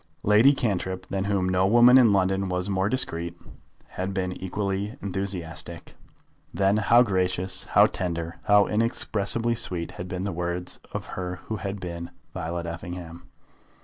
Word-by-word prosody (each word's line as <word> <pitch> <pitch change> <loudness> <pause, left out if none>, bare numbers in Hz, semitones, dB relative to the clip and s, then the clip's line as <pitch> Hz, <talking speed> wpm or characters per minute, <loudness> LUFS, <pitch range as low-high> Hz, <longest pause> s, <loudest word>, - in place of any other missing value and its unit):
Lady 105 +6 +6
Cantrip, 95 -7 -2
than 95 0 -1
whom 100 -2 +1
no 95 +1 +2
woman 120 +4 +7
in 120 -4 +6
London 95 0 +1
was 90 +1 -2
more 95 0 0
discreet, 85 -10 -2 0.5
had 95 +1 -4
been 90 -2 -1
equally 100 +3 -2
enthusiastic. 90 -4 -5 0.6
Then 100 +1 +2
how 115 +3 +5
gracious, 95 -3 -1
how - - +5
tender, 85 -2 -3
how 105 -1 +6
inexpressibly 115 +1 0
sweet 90 -7 -1
had 90 - -7
been 90 0 -4
the 100 - -2
words 90 +1 -4
of - - -4
her 90 -1 -4
who 110 - -3
had 100 -1 -4
been 85 -1 -6 0.2
Violet 85 -1 -4
Effingham! 85 +1 -7
95 Hz, 150 wpm, -26 LUFS, 90-100 Hz, 0.6 s, woman